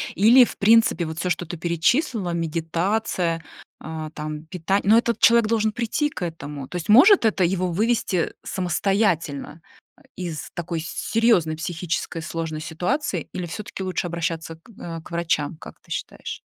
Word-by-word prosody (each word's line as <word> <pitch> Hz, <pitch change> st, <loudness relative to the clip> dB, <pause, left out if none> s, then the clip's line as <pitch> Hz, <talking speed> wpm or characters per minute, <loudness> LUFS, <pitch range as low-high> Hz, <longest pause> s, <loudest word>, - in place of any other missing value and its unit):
Или 235 Hz, +6 st, +7 dB
в -, -, -9 dB
принципе 215 Hz, -5 st, +4 dB
вот 160 Hz, +1 st, -5 dB
всё, 180 Hz, -, -1 dB
что 175 Hz, +1 st, -1 dB
ты 170 Hz, +1 st, -6 dB
перечислила: 180 Hz, -, +1 dB
медитация, 165 Hz, +1 st, -1 dB, 0.4 s
а, 155 Hz, -1 st, -6 dB
там 155 Hz, 0 st, -6 dB
пита 180 Hz, +3 st, 0 dB
но 215 Hz, +4 st, +6 dB
этот 235 Hz, 0 st, +1 dB
человек 235 Hz, -1 st, +5 dB
должен 220 Hz, -1 st, +1 dB
прийти 240 Hz, +6 st, -1 dB
к 185 Hz, -, -6 dB
этому. 150 Hz, -5 st, -6 dB
То 180 Hz, -, -5 dB
есть 170 Hz, -, -6 dB
может 270 Hz, -, +7 dB
это 205 Hz, -4 st, +2 dB
его 185 Hz, +1 st, +1 dB
вывести 205 Hz, -3 st, 0 dB
самостоятельно, 175 Hz, -5 st, -1 dB, 0.4 s
ай -, -, -24 dB
из 170 Hz, -4 st, -5 dB
такой 170 Hz, -1 st, -3 dB
серьёзной 175 Hz, -1 st, +1 dB
психической 170 Hz, 0 st, -3 dB
сложной 160 Hz, -1 st, -4 dB
ситуации 240 Hz, -, -2 dB
или 180 Hz, -1 st, -4 dB
всё-таки 195 Hz, +2 st, -6 dB
лучше 185 Hz, -1 st, -2 dB
обращаться 165 Hz, -1 st, -3 dB
к, 165 Hz, -, -21 dB
а, 165 Hz, -1 st, -6 dB
к 160 Hz, -, -14 dB
врачам, 165 Hz, -3 st, -1 dB
как -, -, -12 dB
ты -, -, -25 dB
считаешь? -, -, -5 dB
175 Hz, 160 wpm, -23 LUFS, 165-215 Hz, 0.4 s, Или